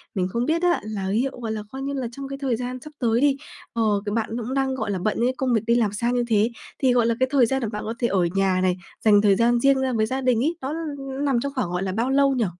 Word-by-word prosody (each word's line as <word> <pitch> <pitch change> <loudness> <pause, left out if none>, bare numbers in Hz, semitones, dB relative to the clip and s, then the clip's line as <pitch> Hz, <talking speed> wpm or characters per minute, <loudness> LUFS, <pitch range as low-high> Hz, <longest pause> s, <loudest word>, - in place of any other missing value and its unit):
mình 185 -1 0
không 235 +6 -1
biết 325 +2 +1
á 355 -1 +3
là 210 -3 -4
liệu 245 +7 +1
gọi 225 -2 -4
là, 215 -1 -4
coi 265 0 -6
như 280 +1 -3
là 265 -3 -2
trong 275 +3 -7
cái 275 0 -6
thời 260 -4 +1
gian 250 +2 -4
sắp 305 - -11
tới 235 -1 +2
đi, 280 -1 +3 0.4
ờ, 230 - 0 0.2
kiểu, 205 - -2
bạn 225 -1 -1
cũng 240 +3 -4
đang, 270 -1 0
gọi 215 -5 -2
là, 190 - -2
bận 210 +4 -1
những 250 +2 +1
công 260 -2 0
việc 220 - +2
đi 235 - +4
làm 220 -4 +2
xa 235 +3 0
như 245 -1 +1
thế 220 +1 +2 0.3
thì, 260 -2 +3
gọi 240 -2 +3
là, 230 0 +2
cái 260 - +3
thời 270 -4 +5
gian 265 +3 -1
mà 230 - -1
bạn 210 - -5
có 225 - -3
thể 240 - +2
ở 190 -4 +2
nhà 190 -1 +2
này, 185 -1 +1 0.3
dành 205 -2 +6
thời 200 -2 +4
gian 235 +3 +3
riêng 275 +1 +4
ra 260 -1 0
với 220 -2 +2
gia 260 +4 -2
đình 250 -2 +2
ấy, 325 +4 0
nó 270 +3 -3 0.5
nằm 275 -4 +2
trong 280 +3 -3
khoảng, 250 -10 -1
gọi 180 +1 -2
là, 190 - -2
bao 230 +6 -1
lâu 275 0 +3
nhỉ? 235 -4 +1
240 Hz, 310 wpm, -24 LUFS, 215-265 Hz, 0.5 s, dành